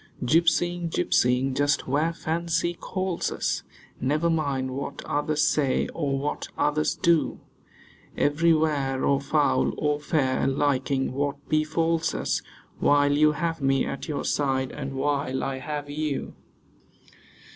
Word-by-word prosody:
Gypsying, 170 Hz, +4 st, +2 dB
gypsying, 125 Hz, -, +2 dB
just 145 Hz, +2 st, +1 dB
where 150 Hz, +5 st, +1 dB
fancy 170 Hz, +1 st, -1 dB
calls 185 Hz, 0 st, -3 dB
us; -, -, -1 dB, 0.4 s
Never 150 Hz, +6 st, +1 dB
mind 140 Hz, -5 st, -1 dB
what 140 Hz, +1 st, -5 dB
others 150 Hz, +1 st, 0 dB
say, 140 Hz, -4 st, +1 dB
or 140 Hz, -4 st, -2 dB
what 145 Hz, +2 st, -3 dB
others 150 Hz, +1 st, +1 dB
do. 170 Hz, -3 st, +2 dB, 0.8 s
Everywhere 150 Hz, -3 st, +2 dB
or 140 Hz, 0 st, +2 dB
foul 145 Hz, +1 st, +1 dB
or 150 Hz, -1 st, 0 dB
fair, 135 Hz, -4 st, 0 dB
liking 135 Hz, -1 st, 0 dB
what 140 Hz, +1 st, -3 dB
befalls 160 Hz, +1 st, +1 dB
us: -, -, -1 dB, 0.4 s
While 145 Hz, 0 st, +4 dB
you 150 Hz, +1 st, +4 dB
have 165 Hz, +1 st, -2 dB
me 135 Hz, -1 st, +2 dB
at -, -, -5 dB
your 150 Hz, -3 st, -3 dB
side, 135 Hz, -2 st, 0 dB
and 135 Hz, -2 st, -6 dB
while 140 Hz, -1 st, -1 dB
I 135 Hz, -1 st, -3 dB
have 145 Hz, +2 st, -5 dB
you. 150 Hz, 0 st, -3 dB
145 Hz, 125 wpm, -26 LUFS, 135-160 Hz, 0.8 s, While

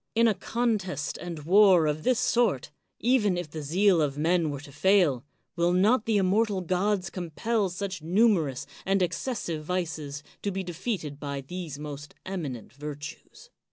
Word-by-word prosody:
In 230 Hz, +1 st, +5 dB
a 220 Hz, -, +4 dB
contest 200 Hz, -, -2 dB
and 170 Hz, -4 st, -6 dB
war 185 Hz, -1 st, +6 dB
of 150 Hz, 0 st, 0 dB
this 255 Hz, +7 st, +2 dB
sort, 220 Hz, -, +1 dB, 0.3 s
even 220 Hz, -6 st, +3 dB
if 175 Hz, -4 st, -5 dB
the 155 Hz, -, -5 dB
zeal 175 Hz, +4 st, +3 dB
of 145 Hz, -2 st, 0 dB
men 165 Hz, +1 st, +2 dB
were 140 Hz, -1 st, -4 dB
to 145 Hz, -, -12 dB
fail, 155 Hz, -4 st, +3 dB, 0.3 s
will 175 Hz, 0 st, +2 dB
not 215 Hz, +6 st, +3 dB
the 220 Hz, -2 st, +3 dB
inmaortal 195 Hz, 0 st, +1 dB
gods 185 Hz, +1 st, 0 dB
compel 195 Hz, +4 st, -1 dB
such 185 Hz, 0 st, -4 dB
numerous 165 Hz, -, +2 dB, 0.2 s
and 195 Hz, -1 st, +2 dB
excessive 175 Hz, -3 st, -3 dB
vices 155 Hz, -5 st, -3 dB, 0.2 s
to 205 Hz, -, -1 dB
be 195 Hz, 0 st, -3 dB
defeated 175 Hz, -4 st, -4 dB
by 140 Hz, -2 st, -4 dB
these 160 Hz, 0 st, -6 dB
most 145 Hz, -1 st, -8 dB
eminent 150 Hz, -, -5 dB
virtues 145 Hz, +1 st, -9 dB
180 Hz, 155 wpm, -27 LUFS, 150-200 Hz, 0.3 s, war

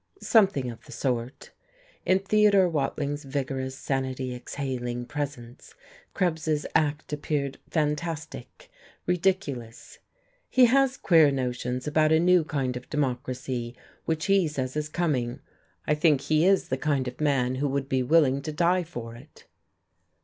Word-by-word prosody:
"Something 190 Hz, -, +3 dB
of 115 Hz, -, -13 dB
the 145 Hz, -, -13 dB
sort." 125 Hz, -2 st, -3 dB, 0.6 s
In 185 Hz, -, +5 dB
Theodore 200 Hz, -1 st, +4 dB
Watling's 145 Hz, -2 st, -2 dB
vigorous, 135 Hz, -1 st, -3 dB
sanity 130 Hz, -2 st, -2 dB
exhaling 125 Hz, -1 st, -4 dB
presence 135 Hz, -3 st, -6 dB, 0.4 s
Krebs's 160 Hz, -5 st, 0 dB
act 150 Hz, -1 st, 0 dB
appeared 145 Hz, -2 st, -2 dB
fantastic, 155 Hz, -3 st, -3 dB, 0.3 s
ridiculous. 170 Hz, -10 st, -2 dB, 0.5 s
"He 255 Hz, -1 st, +6 dB
has 270 Hz, +2 st, +3 dB
queer 160 Hz, -4 st, +5 dB
notions 125 Hz, -1 st, -2 dB
about 155 Hz, +1 st, +2 dB
a 160 Hz, -, +5 dB
new 180 Hz, 0 st, +4 dB
kind 135 Hz, -5 st, -2 dB
of 125 Hz, -, -8 dB
democracy 125 Hz, -3 st, -3 dB, 0.3 s
which 160 Hz, -1 st, -1 dB
he 195 Hz, -3 st, +3 dB
says 130 Hz, -3 st, -4 dB
is 150 Hz, 0 st, -2 dB
coming. 140 Hz, -8 st, -1 dB, 0.5 s
I -, -, +2 dB
think 150 Hz, -2 st, +3 dB
he 155 Hz, +4 st, +2 dB
is 195 Hz, 0 st, +3 dB
the 130 Hz, -, 0 dB
kind 135 Hz, -2 st, 0 dB
of 125 Hz, -, -7 dB
man 135 Hz, -4 st, +2 dB
who 145 Hz, -, +2 dB
would 135 Hz, 0 st, -2 dB
be 130 Hz, -2 st, +1 dB
willing 140 Hz, 0 st, +3 dB
to 155 Hz, +2 st, -5 dB
die 175 Hz, +4 st, +2 dB
for 120 Hz, -9 st, -8 dB
it." 140 Hz, +6 st, -16 dB
145 Hz, 140 wpm, -26 LUFS, 130-160 Hz, 0.6 s, He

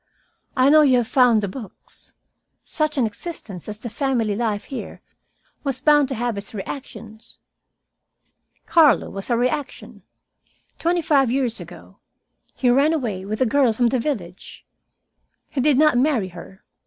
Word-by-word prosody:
I 260 Hz, +2 st, +5 dB
know 310 Hz, 0 st, +7 dB
you 265 Hz, -4 st, +4 dB
have 240 Hz, -2 st, 0 dB
found 240 Hz, -5 st, +4 dB
the -, -, 0 dB
books. 215 Hz, +1 st, -11 dB, 0.5 s
Such 305 Hz, -2 st, -2 dB
an 255 Hz, -, +3 dB
existence 215 Hz, -, -8 dB
as 210 Hz, -, -6 dB
the 225 Hz, -, -8 dB
family 235 Hz, -5 st, -1 dB
life 215 Hz, -2 st, -2 dB
here 270 Hz, -, -8 dB, 0.6 s
was 270 Hz, -3 st, -2 dB
bound 295 Hz, 0 st, +4 dB
to 265 Hz, -, -3 dB
have 235 Hz, -2 st, -2 dB
its 200 Hz, +2 st, -9 dB
reactions. 220 Hz, 0 st, -9 dB, 1.3 s
Carlo 320 Hz, -4 st, +4 dB
was 195 Hz, +3 st, -7 dB
a 235 Hz, -, +2 dB
reaction. 265 Hz, +4 st, -3 dB, 0.8 s
Twenty 345 Hz, 0 st, 0 dB
five 275 Hz, -5 st, +3 dB
years 250 Hz, -2 st, -1 dB
ago -, -, -13 dB, 0.6 s
he 250 Hz, -2 st, +2 dB
ran 280 Hz, +5 st, +3 dB
away 215 Hz, -11 st, -3 dB
with 215 Hz, +3 st, -4 dB
a -, -, +5 dB
girl 260 Hz, -1 st, +2 dB
from 240 Hz, +2 st, +2 dB
the 255 Hz, -, 0 dB
village. 200 Hz, -, -6 dB, 0.9 s
He 270 Hz, -, -1 dB
did 290 Hz, 0 st, +3 dB
not 300 Hz, -4 st, +4 dB
marry 255 Hz, -9 st, +1 dB
her. 180 Hz, +2 st, -13 dB
250 Hz, 155 wpm, -22 LUFS, 215-285 Hz, 1.3 s, know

